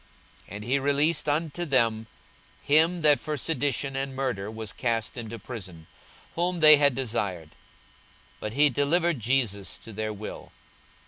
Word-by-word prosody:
42:023:025 100 - -10
And 105 - -7
he 130 +5 +1
released 145 +3 +1
unto 160 +3 -1
them 115 -7 +1 0.6
him 160 +4 +3
that 150 -2 +5
for 155 -1 -4
sedition 140 -2 -1
and 135 0 -3
murder 125 -7 -3
was 110 -1 -7
cast 115 -2 -2
into 115 -2 -6
prison, 95 -8 -9 0.5
whom 175 +1 -1
they 155 -1 +9
had 140 -3 +3
desired; 100 - -3 0.9
but 105 - -5
he 145 +3 +5
delivered 160 +4 +1
Jesus 110 -5 0
to 115 - -11
their 110 +1 -3
will. 105 0 -8
130 Hz, 145 wpm, -26 LUFS, 110-150 Hz, 0.9 s, they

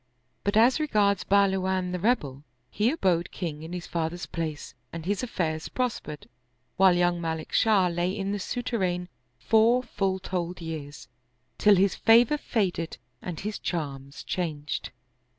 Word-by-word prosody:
But 200 +1 +1
as 245 +6 +5
regards 205 -10 +2
Buhlawan 190 -2 +2
the 180 - -2
Rebel, 150 - 0 0.3
he 215 +3 +2
abode 185 - +1
king 160 -5 -5
in 160 +1 -8
his 180 -1 -5
father's 170 +1 -3
place 155 -5 -5 0.2
and 165 -1 -7
his 200 +1 0
affairs 160 -10 -2
prospered, 245 - -3 0.5
while 190 -1 +5
young 175 -1 +2
Malik 160 -1 -4
Shah 210 -4 +4
lay 175 +1 0
in 195 0 -2
the 205 - -2
souterrain 190 -6 -2 0.3
four 230 +3 +4
full 195 -5 -1
fold 180 -2 -4
years, 155 -4 -7 0.5
till 210 -1 +6
his 195 +1 +3
favor 235 +6 +5
faded 180 -10 -1 0.2
and 175 -4 -6
his 210 +2 -4
charms 140 -5 -4
changed. 155 -5 -3
180 Hz, 145 wpm, -27 LUFS, 165-205 Hz, 0.5 s, till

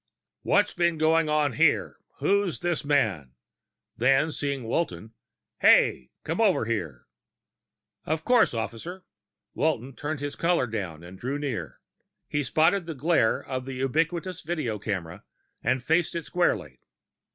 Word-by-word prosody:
"What's - - +2
been 170 -2 +1
going 160 0 +3
on 150 -3 +2
here? - - +2 0.2
Who's 200 -3 +1
this 175 -2 -1
man?" 110 - 0 0.6
Then, 135 +6 +3
seeing 140 -3 -3
Walton, 110 - -2 0.5
"Hey! 65 0 +4
Come 165 +7 -2
over 195 - +3
here!" 85 - -3 1.0
"Of 155 +1 -1
course, 250 - +4
officer." 115 - -5 0.5
Walton 135 -3 -1
turned 150 0 -4
his 145 0 -4
collar 170 -5 +2
down 95 -8 -5
and 90 +2 -11
drew 135 +4 -2
near. 125 - -4 0.5
He 145 - -1
spotted 165 +7 +2
the 165 - -4
glare 140 -5 +2
of 130 -1 -5
a 135 - -4
ubiquitous 165 +7 -1
video 150 -10 -3
camera 95 -6 -4 0.4
and 130 0 0
faced 160 +5 +1
it 170 - -3
squarely. 75 - 0
145 Hz, 135 wpm, -26 LUFS, 115-165 Hz, 1.0 s, Hey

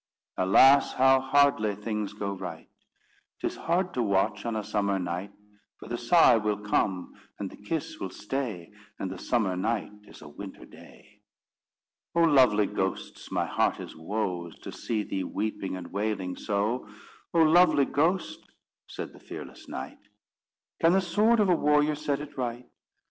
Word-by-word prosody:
Alas, 135 +9 +5
how 135 0 +5
hardly 135 -6 +3
things 105 0 -4
go 100 -1 -3
right! 85 -4 -7 0.7
'Tis - - -2
hard 175 +2 -1
to 125 - 0
watch 100 0 0
on 115 - -2
a 110 - -2
summer 100 -1 0
night, 90 +2 -4 0.5
For - - -12
the 120 - -2
sigh 170 -9 +6
will 105 -1 0
come 100 -3 -1 0.2
and 100 -2 -5
the - - -11
kiss 150 +9 -4
will 95 - -4
stay, 105 -5 -4 0.3
And 95 - -4
the 95 - -7
summer 105 -7 0
night 110 +4 -1 0.2
is - - -14
a - - -10
winter 95 +6 -10
day._ - - -17 1.0
"Oh, 170 - +4
lovely 125 -9 +5
ghosts - - -4
my - - 0
heart - - 0
is - - -8
woes 90 -1 -3
To - - -6
see 110 -3 -2
thee 95 -2 -3
weeping 100 -1 -3
and 90 - -8
wailing 100 -3 -2
so. 105 +2 -2 0.4
Oh, 165 -1 +4
lovely 160 -3 +5
ghost," 170 +7 0 0.5
said - - -7
the - - -15
fearless - - -10
knight, - - -7 0.8
"Can 165 +1 +4
the 190 - +5
sword 210 +6 +3
of 210 - +4
a 180 - +4
warrior 150 0 +3
set 145 -1 -2
it 150 -1 -9
right? 120 0 -3
110 Hz, 160 wpm, -28 LUFS, 100-145 Hz, 1.0 s, sigh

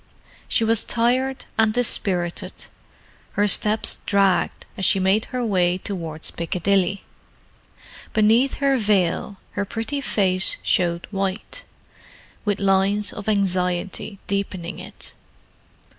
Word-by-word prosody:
She 230 - +2
was 225 0 +3
tired 255 +3 +1
and 220 -1 +4
dispirited; 185 -6 -1 0.7
her 205 0 +2
steps 210 +2 +3
dragged 195 -2 +2
as 190 - -5
she 190 - +4
made 190 +4 +2
her 250 -2 -3
way 180 -4 +2
towards 165 -5 -5
Piccadilly. 185 +3 0 1.1
Beneath 225 +5 +3
her 275 -1 +2
veil 200 -2 +1
her 205 - -2
pretty 225 +8 -3
face 190 -7 +2
showed 170 -1 +1
white, 195 0 -3 0.8
with 205 -1 0
lines 195 +1 +2
of 205 0 -5
anxiety 185 0 -1
deepening 190 -3 -3
it. - - -9
200 Hz, 110 wpm, -22 LUFS, 185-220 Hz, 1.1 s, and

